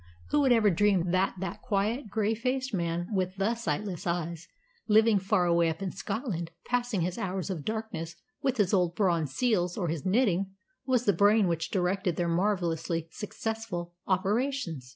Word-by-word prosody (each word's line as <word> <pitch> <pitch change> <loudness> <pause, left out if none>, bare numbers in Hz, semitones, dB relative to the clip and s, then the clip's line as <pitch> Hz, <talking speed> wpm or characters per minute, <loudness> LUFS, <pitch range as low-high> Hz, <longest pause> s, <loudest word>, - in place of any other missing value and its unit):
Who 295 - +4
would 270 -3 +4
ever 220 -4 +5
dream 185 -1 +2
that 185 +1 +2
that 190 -3 -4
quiet, 220 +1 -1
grey 215 +1 +1
faced 255 +3 -2
man 170 -1 -1
with 185 -1 0
the 200 +4 +1
sightless 190 -4 -3
eyes, 170 -1 -2 0.4
living 220 -1 +5
far 190 -1 +2
away 170 -1 +3
up 160 0 -4
in 190 - -2
Scotland, 200 - -3 0.2
passing 245 -5 0
his 175 +1 -2
hours 190 0 -2
of 165 -6 -4
darkness 215 -6 -4 0.3
with 265 -2 0
his 205 -3 +2
old 180 -3 +2
bronze 170 -8 +1
seals 180 -7 +1
or 175 -5 -1
his 160 -2 -3
knitting, 195 -2 +1 0.3
was 250 -2 +2
the 205 - +4
brain 205 +3 +4
which 165 -1 -1
directed 185 -1 0
their 175 - 0
marvellously 170 -3 0
successful 215 -5 -4
operations! 195 - 0
190 Hz, 170 wpm, -29 LUFS, 170-220 Hz, 0.4 s, ever